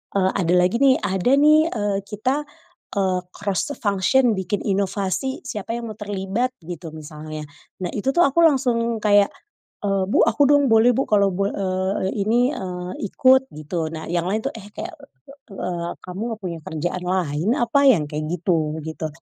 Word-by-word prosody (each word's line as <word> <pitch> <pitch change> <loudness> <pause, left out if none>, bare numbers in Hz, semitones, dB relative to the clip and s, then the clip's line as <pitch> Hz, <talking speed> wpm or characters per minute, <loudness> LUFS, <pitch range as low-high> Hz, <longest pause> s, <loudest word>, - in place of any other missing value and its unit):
eee, 190 -1 +3
ada 175 -1 +1
lagi 180 +5 +3
nih 265 -1 +6
ada 190 +2 -1
nih, 305 +3 +5
eee, 205 -3 -1
kita, 255 +8 -1 0.5
eee, 185 -2 +1
cross 200 - -2
the - - -6
function 225 +5 +2
bikin 190 +2 -2
inovasi 200 +5 -1
siapa 225 -2 -4
yang 230 -2 -5
mau 215 - -11
terlibat 205 +5 -2
gitu 165 -1 -7
misalnya, 155 0 -8 0.4
nah 175 - -1
itu 215 +6 -1
tuh 345 - +5
aku 280 +5 +1
langsung 240 -6 +2
kayak, 205 -1 +5 0.6
eee, 195 -1 +1
"Bu - - +4
aku 260 +6 +3
dong 285 -1 +5
boleh 225 +2 +6
bu 270 - +2
kalau" 200 -2 +3
bo 195 +1 +1
eee, 190 0 -1
"ini," 240 +6 +2
eee, 180 -1 -5 0.2
"ikut 260 0 +4
gitu" 155 +2 -3
nah 160 - -6
yang 175 -1 0
lain 215 +2 0
tuh, - - -2
eh, 205 -2 -9
kayak, 355 0 -6 0.6
eee, 175 -3 -4 0.2
kamu 185 +3 -7 0.2
gak - - -40
punya 170 -2 -4
kerjaan 175 +3 -3
lain 180 -1 0
apa 240 +4 +2
yang 160 - +4
kayak 155 0 -3
gitu 160 -3 0
gitu. 160 0 -4
195 Hz, 175 wpm, -22 LUFS, 180-235 Hz, 0.6 s, nih